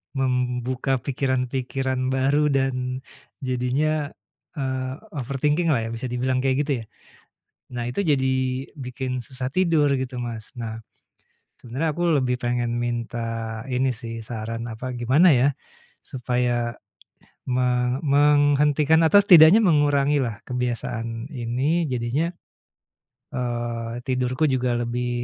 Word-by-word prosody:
membuka 125 0 0
pikiran-pikiran 130 0 -1
baru 140 +3 +2
dan 130 -1 -1 0.4
jadinya, 140 +4 0 0.4
eee, 130 -2 -2 0.2
overthinking 145 +6 0
lah 140 - +3
ya, - - -5
bisa 120 +3 -4
dibilang 130 +1 0
kayak 135 +2 +2
gitu 145 - -3
ya. - - -17 0.9
Nah, 120 -1 -3
itu 125 - -4
jadi 135 -4 +2 0.5
bikin 130 -1 -5
susah 130 -1 -4
tidur 165 -5 +3
gitu 130 -1 -4
Mas. 115 -3 -6
Nah, 115 -1 -5 0.8
sebenarnya 130 +7 -2
aku 175 +3 -3 0.2
lebih 125 -1 0
pengen 120 -1 -1
minta 115 -2 -3
ini 130 0 +1
sih 115 -1 -7
saran 115 0 -5
apa 125 +3 -5
gimana 130 +9 +4
ya, 130 +1 +4 0.6
supaya 120 -2 -1 0.7
me 125 0 +1
menghentikan 145 +1 +4
atau 180 +6 +7
setidaknya 180 0 +8
mengurangilah 145 - +2
kebiasaan 120 -1 -3
ini 130 +7 0
jadinya, 125 +8 -1 1.0
eee, 120 -1 -3
tidurku 130 +3 +1
juga 125 -1 0
lebih, 120 +1 -2
130 Hz, 110 wpm, -24 LUFS, 120-140 Hz, 1.0 s, setidaknya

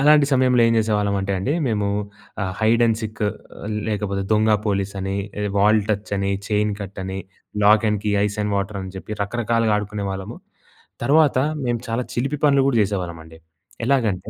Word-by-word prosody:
అలాంటి 150 0 +6
సమయంలో 125 -2 +4
ఏం 115 - +3
చేసేవాళ్ళమంటే 100 -2 0
అండి, 95 +10 -1
మేము 105 -4 0 0.6
ఆహ్, 95 -1 -2
హైడ్ 115 +2 +3
అండ్ 110 -1 +2
సీక్ 110 0 -5 0.7
లేకపోతే 100 -2 -1
దొంగ 110 +1 +3 0.2
పోలీస్ 100 -1 -1
అని, 95 +1 -2 0.4
వాల్ 105 +2 +5
టచ్ 105 -1 -2
అని, 100 0 0 0.2
చైన్ 105 0 +1
కట్ 100 0 -7
అని, 95 0 -4 0.5
lock 105 +2 +6
and 105 -1 -1
key, 105 - +1
ice 105 +1 -2
and 105 0 -1
water 100 +1 -2
అని 95 - -7
చెప్పి 95 +3 -7
రకరకాలుగా 115 +1 0
ఆడుకునేవాళ్ళము. 100 -2 -4 0.7
తర్వాత, 145 +1 +4 0.3
మేము 120 -1 0
చాలా 115 +2 -1
చిలిపి 135 +5 -1
పనులు 140 -1 +5
గూడా 130 -4 +2
చేసేవాళ్ళమండి. 85 -5 -5 0.5
ఎలాగంటే, 110 -8 +1
105 Hz, 160 wpm, -22 LUFS, 100-115 Hz, 0.7 s, అలాంటి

